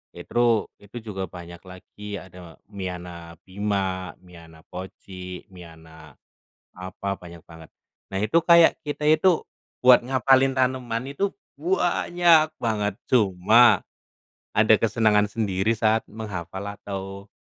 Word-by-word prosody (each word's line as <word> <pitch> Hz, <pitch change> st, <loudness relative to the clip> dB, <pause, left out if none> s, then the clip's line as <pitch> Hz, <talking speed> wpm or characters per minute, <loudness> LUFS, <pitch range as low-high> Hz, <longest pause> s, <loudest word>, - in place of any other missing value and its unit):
itru 115 Hz, +4 st, +1 dB
itu 100 Hz, +4 st, -12 dB
juga 95 Hz, -3 st, -5 dB
banyak 85 Hz, -1 st, -10 dB
lagi 100 Hz, +3 st, -10 dB
ada 90 Hz, -3 st, -14 dB
miana 90 Hz, -3 st, -7 dB
bima, 95 Hz, -2 st, -2 dB
miana 85 Hz, -2 st, -15 dB
poci, 90 Hz, 0 st, -9 dB
miana 80 Hz, -4 st, -14 dB, 0.6 s
apa, 95 Hz, +2 st, -5 dB
banyak 85 Hz, -2 st, -13 dB
banget. 80 Hz, -1 st, -14 dB, 0.4 s
Nah 95 Hz, -, -3 dB
itu 110 Hz, +10 st, +3 dB
kayak 170 Hz, 0 st, +5 dB
kita 150 Hz, -1 st, -5 dB
itu 160 Hz, +3 st, +3 dB, 0.4 s
buat 125 Hz, -1 st, +8 dB
ngafalin 135 Hz, +1 st, +2 dB
tanaman 130 Hz, 0 st, -1 dB
itu 195 Hz, +8 st, 0 dB, 0.3 s
banyak 175 Hz, -1 st, +2 dB
banget, 105 Hz, -4 st, -1 dB
cuma 110 Hz, +1 st, +4 dB, 0.7 s
ada -, -, +5 dB
kesenangan 105 Hz, -2 st, +2 dB
sendiri 100 Hz, -2 st, -1 dB
saat 110 Hz, 0 st, +2 dB
menghafal 95 Hz, -3 st, -7 dB
atau, 100 Hz, 0 st, -8 dB
100 Hz, 110 wpm, -24 LUFS, 90-120 Hz, 0.7 s, buat